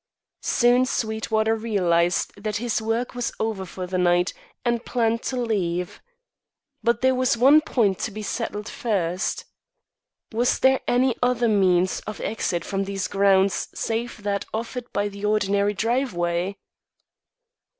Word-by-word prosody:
Soon 245 0 +3
Sweetwater 220 -1 0
realised 180 -6 +1
that 210 +1 -4
his 230 +1 -1
work 225 +3 -1
was 245 -1 -2
over 215 -4 -2
for 185 +1 -6
the 185 0 -2
night 175 0 +2 0.3
and 235 -1 0
planned 230 -1 0
to 260 - -3
leave. 180 -7 -2 0.8
But 235 +1 +1
there 260 0 +4
was 255 -2 +1
one 275 +6 +7
point 215 - +1
to - - -2
be 215 0 -7
settled 210 -1 -3
first. 190 -6 -2 0.9
Was 235 +2 +1
there 265 0 +3
any 250 0 +2
other 245 -1 +2
means 185 -3 +3
of 215 - -5
exit 180 -6 -2
from 195 -1 -2
these 195 -1 -3
grounds 195 -1 +2
save 230 -1 -3
that 200 -1 -1
offered 235 +2 -5
by 205 0 0
the 200 0 -9
ordinary 205 -1 +1
driveway? 195 -6 -1
215 Hz, 140 wpm, -24 LUFS, 195-235 Hz, 0.9 s, one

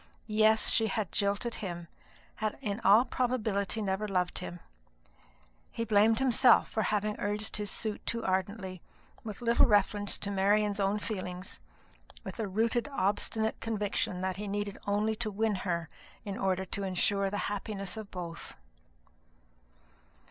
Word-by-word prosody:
Yes, 220 0 +4
she 225 - +4
had 210 -2 -2
jilted 205 +4 0
him 175 -4 -5 0.5
had 215 -1 -2
in 210 -5 -3
all 215 +4 +6
probability 220 -5 0
never 195 +2 -1
loved 180 -3 0
him. 175 - -6 1.1
He 230 - -3
blamed 220 +1 +4
himself 255 -2 +5
for 220 - 0
having 210 0 0
urged 210 +1 0
his 210 -1 -2
suit 215 0 -2
too 230 0 -2
ardently, 190 -1 -2 0.4
with 215 +1 -7
little 235 0 +5
reference 205 -1 +2
to 200 - -4
Marian's 205 +1 +2
own 200 +1 +2
feelings, 185 -3 -4 0.6
with - - -7
a 220 - -1
rooted 230 +6 0
obstinate 220 -1 0
conviction 205 -4 -1
that 185 0 -2
he 205 +1 -4
needed 205 0 -3
only 210 +2 +1
to 225 -1 -2
win 215 +1 0
her 170 -4 -2 0.4
in 200 -1 -4
order 190 -1 0
to 200 - -2
insure 195 +1 +1
the 205 - -3
happiness 200 -1 -3
of 215 -2 -7
both. 170 -2 -7
205 Hz, 145 wpm, -31 LUFS, 195-220 Hz, 1.1 s, all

